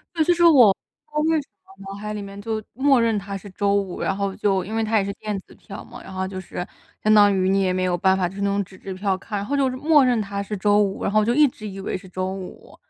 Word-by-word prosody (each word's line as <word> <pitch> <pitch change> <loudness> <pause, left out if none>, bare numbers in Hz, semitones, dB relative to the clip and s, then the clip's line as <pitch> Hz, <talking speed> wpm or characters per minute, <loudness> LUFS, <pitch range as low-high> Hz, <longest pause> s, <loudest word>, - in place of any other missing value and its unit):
对， 320 -2 +2
就 350 - +3
是 345 0 +2
我 260 -11 +7
不 - - -20
知 300 0 -20
道 - - +3
为 320 - +2
什 280 - -13 0.2
么 195 - -18
脑 195 - -6
海 210 0 -5
里 210 - -5
面 200 0 -9
就 220 +1 -3
默 265 +1 +3
认 230 -2 +2
它 200 0 -5
是 200 +1 -9
周 200 +1 0
五， 195 -3 -2
然 195 - -1
后 200 -1 -2
就 195 -3 +1
因 215 - -6
为 225 - +1
它 220 0 +2
也 195 - +1
是 200 - -3
电 210 -1 -4
子 - - -19
票 - - -10
嘛， - - -12
然 - - -11
后 190 0 -2
就 190 0 -6
是 180 -1 -6 0.4
相 215 - +3
当 205 -1 +6
于 185 0 +1
你 195 +1 +2
也 185 - +1
没 185 0 0
有 180 -1 +1
办 190 +2 +3
法 180 -2 0
就 180 - -12
是 - - -6
那 - - +2
种 200 0 0
纸 185 - -16
质 195 - -7
票 190 0 -1
看。 205 +2 -5
然 200 - -3
后 285 +4 -1
就 270 -2 +2
就 255 - -5
默 295 -1 +5
认 245 -3 +2
它 200 -1 -3
是 210 +1 -5
周 205 +1 +3
五， 195 -1 -2
然 - - -1
后 215 0 +4
就 235 - +1
一 300 +2 +6
直 215 -3 -9
以 195 0 -8
为 195 - -3
是 190 0 -11
周 185 +1 -3
五。 190 -1 -10
200 Hz, 345 characters per minute, -23 LUFS, 190-225 Hz, 0.4 s, 我